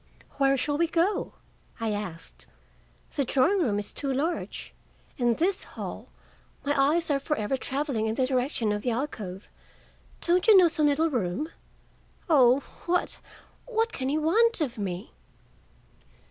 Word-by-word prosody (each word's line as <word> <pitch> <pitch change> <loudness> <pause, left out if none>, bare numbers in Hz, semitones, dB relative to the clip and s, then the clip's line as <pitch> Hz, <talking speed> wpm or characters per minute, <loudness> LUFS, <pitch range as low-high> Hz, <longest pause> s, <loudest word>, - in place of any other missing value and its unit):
"Where 275 0 +4
shall 290 +3 -1
we 335 - +3
go?" 340 +5 0 0.5
I 225 -1 -1
asked. 195 -6 -6 0.7
"The 280 - +1
drawing 275 +10 +2
room 215 -10 +1
is 205 - -4
too 280 -2 -2
large. 305 +6 -3 0.5
In 240 -2 +3
this 370 - 0
hall - - -8 0.6
my 285 - +2 0.2
eyes 335 -3 0
are 280 - +2
for 300 +2 -1
ever 215 +5 -1
traveling 265 -4 -2
in 220 - -1
the 260 - +2
direction 255 -4 0
of 210 0 -1
the 250 - -1
alcove. 225 -7 -4 0.7
Don't 355 +3 +2
you 430 -3 +9
know 360 -2 +7
some 310 -2 +2
little 310 +3 +2
room? 245 - -1 0.8
Oh, 265 -5 +5 0.3
what, 355 +1 0 0.5
what 455 -1 0
can 260 0 -2
he 295 - +1
want 440 +10 +3
of 260 -7 -2
me?" 190 +1 -4
275 Hz, 150 wpm, -27 LUFS, 230-330 Hz, 0.8 s, you